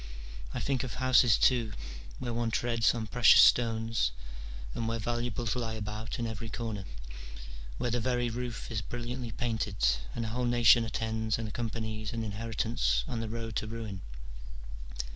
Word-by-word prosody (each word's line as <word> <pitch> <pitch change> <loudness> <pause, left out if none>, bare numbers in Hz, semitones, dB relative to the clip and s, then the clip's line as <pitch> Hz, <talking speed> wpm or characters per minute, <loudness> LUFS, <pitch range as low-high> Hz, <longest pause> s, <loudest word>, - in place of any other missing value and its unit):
I - - -3
think 135 -2 0
of 130 - -5
houses 130 -3 +5
too, 120 -4 +3 0.4
where 120 -2 -4
one 115 0 0
treads 115 0 +2
on 115 -2 -3
precious 120 +2 +7
stones, 115 - +4 0.6
and 115 - -2
where 115 0 0
valuables 120 0 -2
lie 115 -3 -2
about 105 +1 -5
in 120 - -2
every 115 0 -5
corner, 110 -4 -4 0.9
where 120 - -1
the 120 - +1
very 120 0 0
roof 120 0 -4
is 110 -3 -1
brilliantly 120 +2 -5
painted, 110 -3 -2 0.4
and 115 - -2
a - - -3
whole 125 +3 -1
nation 120 -1 +6
attends 110 0 -1
and 115 -1 -4
accompanies 110 -1 -4
an 115 -1 -2
inheri 110 +2 -5
tance - - +1
on 120 - -3
the 115 -1 -3
road 115 -1 -5
to 110 - -2
ruin. 110 -4 -6
115 Hz, 160 wpm, -30 LUFS, 110-120 Hz, 0.9 s, precious